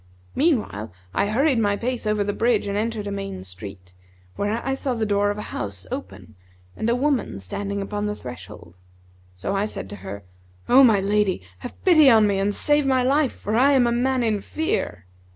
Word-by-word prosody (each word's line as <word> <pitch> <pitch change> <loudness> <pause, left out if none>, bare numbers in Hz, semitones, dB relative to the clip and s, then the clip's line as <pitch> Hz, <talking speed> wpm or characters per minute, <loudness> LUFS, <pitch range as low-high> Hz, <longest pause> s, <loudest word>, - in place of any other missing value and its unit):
Meanwhile, 225 - 0 0.2
I - - +1
hurried 260 +4 +2
my 205 -2 +2
pace 245 -1 -3
over 210 -1 +1
the 205 0 -2
bridge 230 -1 +1
and 200 0 -2
entered 215 0 -2
a 200 - -4
main 195 - -5
street, 90 0 -9 0.4
where 210 +3 -2
I 270 - 0
saw 265 -1 -2
the 225 -1 -1
door 205 0 +2
of 205 - -2
a 210 - -4
house 100 -3 -5
open 110 - -7 0.4
and 220 - -1
a 235 - +3
woman 265 - 0
standing 200 - -4
upon 205 +1 -3
the 210 - -2
threshold. 95 - -10 0.6
So 90 - -3
I 200 +1 +1
said 95 - -7
to - - -7
her, 100 +1 -8 0.4
'O 265 +3 +7
my 220 -6 +5
lady, 200 - +1 0.2
have - - -10
pity 315 -6 +7
on 220 -3 +6
me 200 -1 +1
and 200 +1 0
save 295 -1 +2
my 260 -1 +3
life; 275 +1 +2
for 210 - -5
I 270 +4 +5
am 260 -3 +4
a 235 - +2
man 250 +1 +1
in 215 -3 0
fear.' 105 - -2
210 Hz, 205 wpm, -23 LUFS, 195-250 Hz, 0.6 s, O